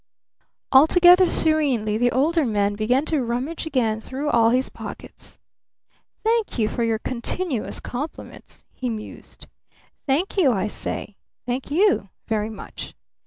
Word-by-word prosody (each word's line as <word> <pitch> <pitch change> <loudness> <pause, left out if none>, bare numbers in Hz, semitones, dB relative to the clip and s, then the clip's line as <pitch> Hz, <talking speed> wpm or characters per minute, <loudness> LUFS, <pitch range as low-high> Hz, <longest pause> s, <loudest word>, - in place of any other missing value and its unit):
Altogether 350 +6 +6
serenely 275 -10 +2
the 245 +2 +2
Older 310 +6 +2
Man 205 -4 0
began 245 +7 +1
to 310 -3 0
rummage 255 +8 -3
again 225 -7 0
through 280 +5 -3
all 230 -1 +4
his 255 +2 +1
pockets. - - -10 0.9
"Thank 450 - 0
you 220 -3 +2
for 235 - -2
your 225 -1 +1
continuous 255 - -3
compliments," 285 +6 -8
he 255 - -4
mused. 215 -2 -8 0.6
"Thank 315 +10 0
you, 310 -9 +4
I 195 -3 0
say. 210 -1 -5 0.3
Thank 250 +2 -3
you 350 - +2 0.2
very 215 -1 -1
much. 220 - -9
255 Hz, 130 wpm, -23 LUFS, 225-315 Hz, 0.9 s, Altogether